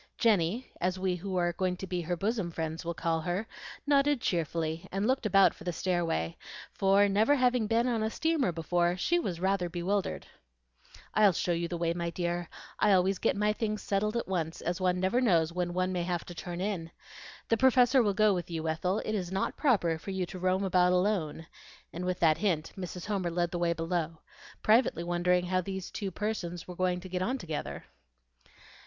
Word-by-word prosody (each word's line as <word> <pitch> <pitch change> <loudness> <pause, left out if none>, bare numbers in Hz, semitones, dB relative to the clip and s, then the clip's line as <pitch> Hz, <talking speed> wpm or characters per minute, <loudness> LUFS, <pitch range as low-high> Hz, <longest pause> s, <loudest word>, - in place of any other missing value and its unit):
Jenny, 215 +1 +1
as 185 +1 0
we 185 -1 0
who 190 +2 -5
are 175 -1 +1
going 180 +1 -1
to 190 - -5
be 180 -1 -2
her 175 +1 -2
bosom 205 -1 -1
friends 160 0 -4
will 170 0 -3
call 165 -1 0
her, 175 +6 -2 0.4
nodded 285 -1 +3
cheerfully, 165 -3 -2
and 195 +2 -1
looked 255 -2 +1
about 195 -1 +5
for - - -13
the 180 - -1
stairway; 165 - -1 0.4
for, 195 +1 +4
never 215 +8 +3
having 250 -4 +2
been 230 +2 +2
on 235 -3 0
a 220 - 0
steamer 315 - +1
before, 175 +2 0
she 345 - +2
was 180 - -3
rather 190 -1 0
bewildered. 185 +3 -2 0.9
"I'll 210 -3 +5
show 175 - -1
you 170 0 0
the 175 - -4
way, 170 0 0
my 170 0 -2
dear. 175 0 -3 0.3
I 210 -1 +4
always 190 +1 +2
get - - +1
my 210 +1 +2
things 215 -1 -3
settled 210 +3 0
at 235 - -3
once, 165 -4 -2
as 175 +2 -2
one 180 -1 +2
never 190 +7 +2
knows 170 -8 +3
when 175 0 -1
one 185 +1 0
may 180 - -1
have 175 -1 -2
to 175 - -8
turn 175 0 -6
in. 190 -5 -2 0.6
The 230 - +3
Professor 260 +1 +5
will 205 -4 +1
go 215 -1 +4
with 175 -2 -3
you, 165 -1 -3
Ethel; 180 +6 -1
it 215 - -2
is 185 -4 -2
not 190 0 -1
proper 180 - +2
for 195 - -9
you 190 -1 -1
to 185 +1 -8
roam 185 +2 +1
about 180 -1 +3
alone;" 180 -4 0 0.5
and 175 +2 -4
with 180 0 -1
that 160 -1 +4
hint 175 -7 0
Mrs. 180 -2 -6
Homer 195 -4 -1
led 175 0 -1
the 175 - -3
way 170 -1 +2
below, 165 -1 -2 0.5
privately 215 -6 +3
wondering 175 +1 +1
how 185 +1 +1
these 190 0 -5
young 200 - -1
persons 180 -4 -4
were 180 - -7
going 180 0 0
to 185 - -8
get 180 0 -3
on 250 +8 0
together. 160 - -5
180 Hz, 205 wpm, -30 LUFS, 170-205 Hz, 0.9 s, about